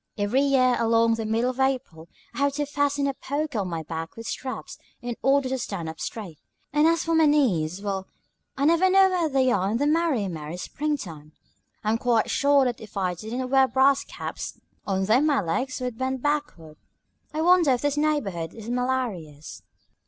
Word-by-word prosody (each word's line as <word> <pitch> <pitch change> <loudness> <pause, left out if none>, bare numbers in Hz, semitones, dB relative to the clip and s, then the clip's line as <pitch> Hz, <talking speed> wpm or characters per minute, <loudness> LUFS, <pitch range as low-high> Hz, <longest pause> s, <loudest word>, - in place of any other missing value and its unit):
Every 210 +6 +1
year 255 -3 +3
along 230 0 +3
about 225 - +1
the 225 - -3
middle 230 +3 +1
of 255 - -12
April 250 -12 -1 0.2
I - - -7
have 280 0 +2
to 290 +1 -1
fasten 285 0 0
a 275 - 0
poker 285 -2 -3
on 195 - -2
my 165 -2 -4
back 165 +1 -6
with 230 - -9
straps, 260 +3 -6 0.2
in 240 -1 -5
order 275 0 +3
to 265 0 -2
stand 190 -8 -4
up 160 - -9
straight; 185 -9 -6 0.3
and 300 +2 +4
as 335 0 +2
for 330 - -1
my 320 -1 +5
knees 200 - +1
well, 195 -2 -3 0.5
I 280 - +1
never 335 +4 +4
know 385 0 +6
where 345 -4 +1
they 265 -2 +2
are 195 -2 +1
in 220 - 0
the 285 - 0
merry, 300 -8 +1
merry 160 -1 -6
spring 295 +10 -2
time. 155 - -10 0.5
I'm 220 +2 +1
quite 235 -3 +1
sure 280 -1 +4
that 245 -2 -2
if 215 -2 -10
I 185 -2 0
didn't 240 +8 -5
wear 265 -1 +5
brass 265 +2 +3
caps - - -7 0.3
on 190 -1 0
them 245 +9 +3
my 285 -3 +3
legs 255 +11 -2
would 250 -2 -4
bend 260 -1 -2
backward. 290 - -2 0.5
I 310 +1 -2
wonder 350 -3 +5
if 245 - -2
this 290 -1 +1
neighborhood 225 - -1
is 225 +1 -7
malarious." 215 - -3
250 Hz, 200 wpm, -25 LUFS, 195-285 Hz, 0.5 s, know